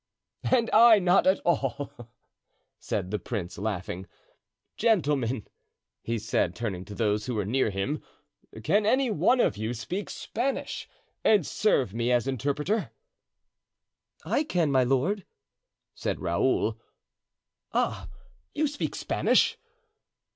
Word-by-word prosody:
"And 240 Hz, -3 st, +3 dB
I 225 Hz, 0 st, +8 dB
not 185 Hz, -1 st, +3 dB
at 190 Hz, -, +4 dB
all," 135 Hz, -6 st, -2 dB, 0.7 s
said 90 Hz, -, -3 dB
the 105 Hz, -, -1 dB
prince, 90 Hz, -3 st, -5 dB
laughing. 95 Hz, -3 st, -4 dB, 0.7 s
"Gentlemen," 145 Hz, -, +1 dB, 0.6 s
he 115 Hz, 0 st, -2 dB
said, 90 Hz, -4 st, 0 dB
turning 95 Hz, -6 st, -4 dB
to 105 Hz, -, -9 dB
those 105 Hz, 0 st, 0 dB
who 125 Hz, -, -2 dB
were 105 Hz, -2 st, -1 dB
near 120 Hz, +3 st, +1 dB
him 105 Hz, +10 st, -2 dB, 0.6 s
"can 205 Hz, -, +2 dB
any 255 Hz, +1 st, +3 dB
one 210 Hz, -, +3 dB
of 100 Hz, -, +2 dB
you 110 Hz, +3 st, -3 dB
speak 180 Hz, -, -4 dB
Spanish 260 Hz, +5 st, -3 dB, 0.3 s
and 205 Hz, -7 st, +4 dB
serve 135 Hz, -, +1 dB
me 115 Hz, +2 st, 0 dB
as 120 Hz, +1 st, +2 dB
interpreter?" 145 Hz, -, -1 dB, 1.4 s
"I 290 Hz, -, +1 dB
can, 170 Hz, -, 0 dB
my 130 Hz, -1 st, +4 dB
lord," 135 Hz, +11 st, +1 dB, 0.7 s
said -, -, -3 dB
Raoul. -, -, 0 dB, 0.9 s
"Ah, -, -, -1 dB, 0.5 s
you 305 Hz, -, +2 dB
speak 290 Hz, 0 st, -3 dB
Spanish?" -, -, +2 dB
135 Hz, 120 wpm, -27 LUFS, -, 1.4 s, I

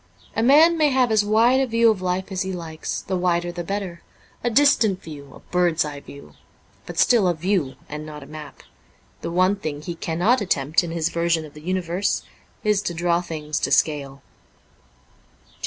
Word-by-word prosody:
A -, -, +1 dB
man 315 Hz, +7 st, +6 dB
may 300 Hz, -1 st, +4 dB
have 255 Hz, -3 st, +2 dB
as 215 Hz, -1 st, +4 dB
wide 225 Hz, +5 st, +4 dB
a 270 Hz, -, +1 dB
view 230 Hz, -1 st, +4 dB
of 200 Hz, -4 st, -4 dB
life 185 Hz, +2 st, -2 dB
as 190 Hz, -1 st, -2 dB
he 190 Hz, -, -2 dB
likes, 165 Hz, -3 st, -5 dB
the 190 Hz, -, -3 dB
wider 175 Hz, -1 st, 0 dB
the 175 Hz, 0 st, -5 dB
better: 190 Hz, -2 st, -4 dB, 0.4 s
a 240 Hz, -, +1 dB
distant 230 Hz, -6 st, +3 dB
view, 145 Hz, -3 st, -10 dB
a -, -, -14 dB
bird's 175 Hz, -3 st, +2 dB
eye 145 Hz, -1 st, -6 dB
view, 140 Hz, 0 st, -13 dB, 0.5 s
but -, -, -8 dB
still 230 Hz, -6 st, +4 dB
a 175 Hz, -, +1 dB
view 170 Hz, -5 st, -1 dB
and 150 Hz, 0 st, -6 dB
not 150 Hz, -1 st, -9 dB
a -, -, -12 dB
map. 155 Hz, 0 st, -11 dB, 0.6 s
The -, -, -4 dB
one 185 Hz, +3 st, +2 dB
thing 150 Hz, -5 st, -5 dB
he 170 Hz, -, -4 dB
cannot 175 Hz, +9 st, +1 dB
attempt 155 Hz, -4 st, +1 dB
in 170 Hz, -, -5 dB
his 165 Hz, 0 st, -1 dB
version 170 Hz, -1 st, 0 dB
of 150 Hz, -, -13 dB
the 150 Hz, -, -12 dB
universe 180 Hz, +2 st, -1 dB, 0.4 s
is 210 Hz, -2 st, +2 dB
to 175 Hz, -, -4 dB
draw 170 Hz, +1 st, +1 dB
things 155 Hz, -3 st, -4 dB
to -, -, -1 dB
scale. 140 Hz, -3 st, 0 dB
175 Hz, 190 wpm, -23 LUFS, 155-205 Hz, 0.6 s, man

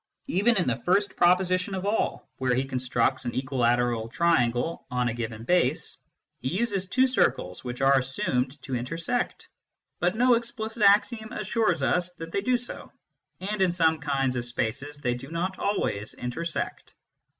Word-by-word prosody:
Even 235 Hz, -1 st, +2 dB
in 180 Hz, -, +2 dB
the 120 Hz, -, +2 dB
first 185 Hz, -, +1 dB
proposition 185 Hz, +2 st, +3 dB
of 190 Hz, 0 st, -4 dB
all, 210 Hz, +2 st, -1 dB
where 130 Hz, -1 st, +1 dB
he 130 Hz, -, +1 dB
constructs 130 Hz, 0 st, 0 dB
an 120 Hz, -, -3 dB
equilateral 120 Hz, -3 st, +1 dB
triangle 130 Hz, -1 st, +1 dB
on 125 Hz, -1 st, 0 dB
a -, -, -2 dB
given 115 Hz, -1 st, -5 dB
base, 180 Hz, +8 st, +1 dB, 0.4 s
he -, -, -4 dB
uses 195 Hz, -, -1 dB
two 255 Hz, +7 st, +3 dB
circles 90 Hz, -, 0 dB
which 125 Hz, +1 st, -5 dB
are 135 Hz, 0 st, +5 dB
assumed 130 Hz, +1 st, -1 dB
to 135 Hz, -, -6 dB
intersect. 165 Hz, -, -2 dB, 0.5 s
But 180 Hz, +3 st, +1 dB
no 250 Hz, +2 st, +5 dB
explicit 230 Hz, -1 st, -3 dB
axiom 215 Hz, +2 st, +4 dB
assures 180 Hz, -10 st, 0 dB
us 180 Hz, +7 st, +1 dB
that 165 Hz, -1 st, -8 dB
they 200 Hz, -, 0 dB
do 255 Hz, +2 st, +2 dB
so, 245 Hz, -, -6 dB, 0.5 s
and 205 Hz, +1 st, -2 dB
in 185 Hz, -2 st, +4 dB
some 160 Hz, -2 st, +3 dB
kinds 135 Hz, -3 st, 0 dB
of 120 Hz, -, -1 dB
spaces 130 Hz, +4 st, -3 dB
they 125 Hz, -4 st, -1 dB
do 125 Hz, +3 st, -8 dB
not 180 Hz, +3 st, -3 dB
always 110 Hz, -, -1 dB
intersect. 160 Hz, +7 st, -4 dB
160 Hz, 160 wpm, -27 LUFS, 125-195 Hz, 0.5 s, are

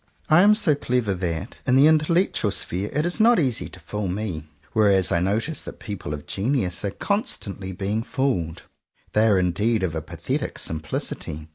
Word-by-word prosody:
I 155 Hz, +2 st, +7 dB
am 210 Hz, +2 st, +6 dB
so 185 Hz, -8 st, +4 dB
clever 125 Hz, -7 st, 0 dB
that, 90 Hz, +2 st, -4 dB
in 125 Hz, -, +4 dB
the 135 Hz, +2 st, +7 dB
intellectual 160 Hz, -, +3 dB
sphere, 100 Hz, 0 st, -2 dB
it 150 Hz, +3 st, 0 dB
is 175 Hz, +5 st, -1 dB
not 230 Hz, 0 st, +5 dB
easy 130 Hz, -7 st, 0 dB
to 90 Hz, -, -10 dB
fool 100 Hz, +4 st, -4 dB
me; 90 Hz, -5 st, -3 dB, 0.3 s
whereas 100 Hz, -4 st, +3 dB
I 85 Hz, -, +3 dB
notice 110 Hz, -, 0 dB
that -, -, -8 dB
people 100 Hz, -8 st, -6 dB
of 75 Hz, -, -10 dB
genius 100 Hz, -5 st, -1 dB
are 100 Hz, -, 0 dB
constantly 100 Hz, -, -3 dB
being 100 Hz, +4 st, -2 dB
fooled. 115 Hz, -11 st, -2 dB, 0.5 s
They 110 Hz, +1 st, +4 dB
are 105 Hz, -3 st, +4 dB
indeed 100 Hz, +4 st, +1 dB
of 85 Hz, -4 st, -1 dB
a 80 Hz, -, -2 dB
pathetic -, -, -4 dB
simplicity. 80 Hz, 0 st, -4 dB
105 Hz, 175 wpm, -24 LUFS, 90-135 Hz, 0.5 s, I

